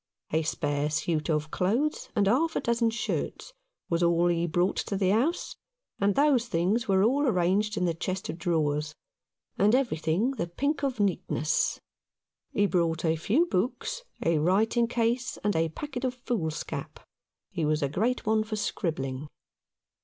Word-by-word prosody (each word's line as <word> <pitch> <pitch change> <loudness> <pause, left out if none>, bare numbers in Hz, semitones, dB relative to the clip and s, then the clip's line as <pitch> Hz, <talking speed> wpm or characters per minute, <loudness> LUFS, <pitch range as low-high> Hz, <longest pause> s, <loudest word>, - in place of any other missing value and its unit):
A 160 - +2
spare 145 -2 -1
suit 155 +1 -1
of 155 -1 0
clothes 240 +12 0
and 205 -3 +3
half 290 +11 +2
a - - +2
dozen 235 -1 +1
shirts 235 - -3 0.3
was 170 0 0
all 170 0 +3
he 170 0 +1
brought 175 +3 +1
to 200 - -2
the 190 -1 +2
house, 265 - 0 0.4
and 200 0 +2
those 275 -5 +3
things 195 +6 +1
were 190 -1 +3
all 275 +6 +3
arranged 205 +1 +1
in 180 - +1
the 170 - +1
chest 185 +3 -3
of 165 - -5
drawers, 155 -2 0 0.6
and 210 +4 +5
everything 210 - +1
the 210 -11 -3
pink 280 - -1
of 265 -5 -1
neatness. 180 -6 0 0.7
He 205 - +2
brought 170 -4 +1
a 160 0 +3
few 220 - +2
books, 260 - -2 0.2
a 165 -2 +3
writing 220 +8 +2
case, 240 +1 0
and 205 0 +1
a 160 0 +2
packet 270 - -6
of 255 -1 -1
foolscap. 205 -11 -4 0.5
He 170 -4 -2
was 150 0 +1
a - - +2
great 220 - -1
one 215 0 +2
for 215 0 -4
scribbling. 150 -9 -3
190 Hz, 160 wpm, -28 LUFS, 165-235 Hz, 0.7 s, and